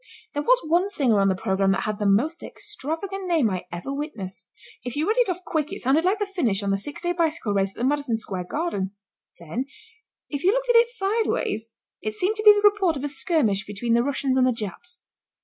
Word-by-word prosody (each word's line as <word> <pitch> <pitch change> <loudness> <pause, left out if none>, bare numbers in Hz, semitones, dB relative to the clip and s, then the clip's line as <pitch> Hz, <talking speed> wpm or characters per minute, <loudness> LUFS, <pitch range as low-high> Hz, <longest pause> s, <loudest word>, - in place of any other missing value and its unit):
There 290 - -1
was - - +4
one 345 +5 +2
singer 255 - +2
on 195 - +3
the 190 - +1
programme 195 +1 +1
that 195 0 -1
had 215 -1 -3
the 205 - +1
most 290 +12 +2
extravagant 370 +7 -5
name 315 - +2
I 185 -1 -3
ever 175 +11 -5
witnessed. 195 - -6 0.3
If 245 -1 -5
you 300 +2 0
read 445 +4 +2
it 485 - +3
off 365 0 -3
quick 310 0 -1
it 390 - -5
sounded 275 +6 +3
like 385 +4 +3
the 415 - -1
finish 255 - 0
of 200 - 0
the 195 - +2
six 290 - -5
day 350 - +1
bicycle 330 -9 0
race 195 -1 +1
at - - -18
the - - -4
Madison 280 -3 +1
Square 185 -5 -4
Garden. 205 - -2 0.4
Then 170 +11 -4 0.6
if 285 -1 -4
you 380 +3 +5
looked - - -1
at 485 - +4
it 465 0 +7
sideways 430 - -1 0.3
it 215 0 -3
seemed 380 - 0
to 430 - -2
be 425 - +11
the 415 0 +5
report 390 -7 +2
of 270 - -6
a - - 0
skirmish 275 - +1
between 210 +3 -1
the 235 - +4
Russians 265 0 0
and 255 -1 +4
the - - +3
Japs. 355 - -6
290 Hz, 235 wpm, -24 LUFS, -, 0.6 s, be